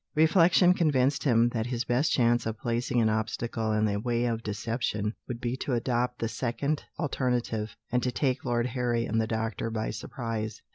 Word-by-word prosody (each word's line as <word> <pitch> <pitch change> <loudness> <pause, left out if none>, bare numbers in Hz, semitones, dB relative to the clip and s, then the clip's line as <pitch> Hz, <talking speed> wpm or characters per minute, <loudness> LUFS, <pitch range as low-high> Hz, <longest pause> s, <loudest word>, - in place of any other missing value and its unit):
Reflection 170 +3 +5
convinced 145 -5 +2
him 120 -3 +4
that 115 -1 -2
his 120 -1 -1
best 125 +6 +1
chance 120 -2 +2
of 110 0 -3
placing 120 +2 -1
an 110 - +3
obstacle 110 0 -1
in 110 0 +2
the 100 -1 0
way 120 +2 0
of 115 -1 -1
deception 105 0 -2
would 120 -2 -5
be 120 0 -2
to 135 - -2
adopt 125 +1 0
the 115 - -1
second 130 +6 -2
alternative, 125 -7 -1 0.2
and 125 +1 +2
to 125 - 0
take 130 0 0
Lord 120 -2 0
Harry 120 -2 0
and 110 +1 +1
the 110 - -1
doctor 115 0 -2
by 110 -1 -2
surprise. 110 -1 -4
120 Hz, 185 wpm, -28 LUFS, 110-125 Hz, 0.2 s, Reflection